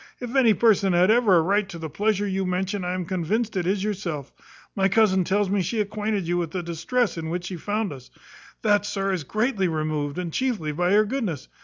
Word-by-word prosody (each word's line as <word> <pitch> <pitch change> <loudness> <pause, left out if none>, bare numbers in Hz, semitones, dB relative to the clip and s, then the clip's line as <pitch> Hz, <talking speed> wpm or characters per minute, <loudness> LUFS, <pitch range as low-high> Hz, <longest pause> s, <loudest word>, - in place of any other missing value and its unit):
If 245 +1 -6
any 235 -6 +5
person 200 -4 +3
had 180 +4 +4
ever 225 -5 +4
a - - +5
right 200 +3 +1
to 175 - -7
the 160 -1 -5
pleasure 205 +6 0
you 195 0 -1
mention, 190 +2 -2
I 180 +1 -2
am 185 -1 -3
convinced 195 +6 -1
it 180 -2 -1
is 195 +1 0
yourself. 180 -9 -4 0.4
My 195 -1 +3
cousin 195 -2 +3
tells 200 +3 +1
me 200 -1 +2
she 200 +6 -2
acquainted 210 -2 -2
you 175 +1 0
with 170 -2 -1
the 180 +2 -4
distress 170 +5 -1
in 160 -1 -4
which 175 +1 -3
she 180 - -5
found 205 +1 -2
us. 130 -2 -12 0.5
That, 205 -2 +3
sir, 195 -1 -1
is 180 - -2
all 145 - -13
greatly 215 -3 +1
removed, 155 -2 -2
and 175 -3 -4
chiefly 230 -13 -1
by 175 +5 +1
your 215 +1 +5
goodness. 210 - -3
190 Hz, 225 wpm, -24 LUFS, 175-210 Hz, 0.5 s, any